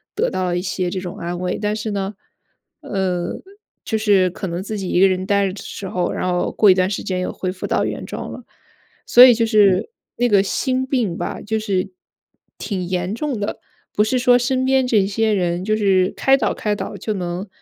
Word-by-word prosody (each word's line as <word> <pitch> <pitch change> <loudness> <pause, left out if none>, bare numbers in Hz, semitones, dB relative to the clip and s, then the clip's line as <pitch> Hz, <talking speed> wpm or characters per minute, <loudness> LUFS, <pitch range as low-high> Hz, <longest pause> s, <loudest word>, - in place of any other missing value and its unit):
得 475 +4 +1
到 185 - -1
了 175 0 -1
一 - - -1
些 185 -1 -2
这 185 - -3
种 180 -2 -7
安 175 +1 -4
慰。 180 0 -2
但 210 0 0
是 215 0 -4
呢， 200 0 -3 0.7
呃， 185 -3 -2 0.5
就 220 - -1
是 200 -4 +3
可 190 +1 -5
能 175 +2 -4
自 215 +1 -5
己 185 - -4
一 175 - +1
个 195 - +7
人 185 0 -1
呆 200 -1 +2
着 185 - -4
的 200 - -9
时 195 - -7
候， 180 - -1
然 - - -2
后 180 - 0
过 205 -3 +5
一 - - +4
段 185 0 +1
时 200 - -3
间 185 -1 -2
又 - - -2
恢 185 -1 -3
复 185 - -6
到 - - +1
原 - - -4
状 - - -6
了， - - -9 0.6
所 245 - +8
以 250 - +7
就 230 0 +1
是 210 - +3 0.3
那 245 - +2
个 200 -2 +5
心 260 +5 -1
病 235 -10 -1
吧， - - -4
就 220 +1 -2
是， 195 - -2 0.7
挺 190 -4 -4
严 180 +2 -2
重 270 -4 -3
的。 205 - -3 0.3
不 210 - +3
是 250 +4 0
说 245 0 +5
身 260 +1 0
边 265 -1 +3
这 205 -5 +3
些 220 +2 0
人 175 -2 -1
就 215 0 +1
是 190 -2 +2
开 270 0 +4
导 - - 0
开 210 -1 -2
导 - - -6
就 215 - -3
能 180 +1 -4
200 Hz, 245 characters per minute, -20 LUFS, 185-220 Hz, 0.7 s, 所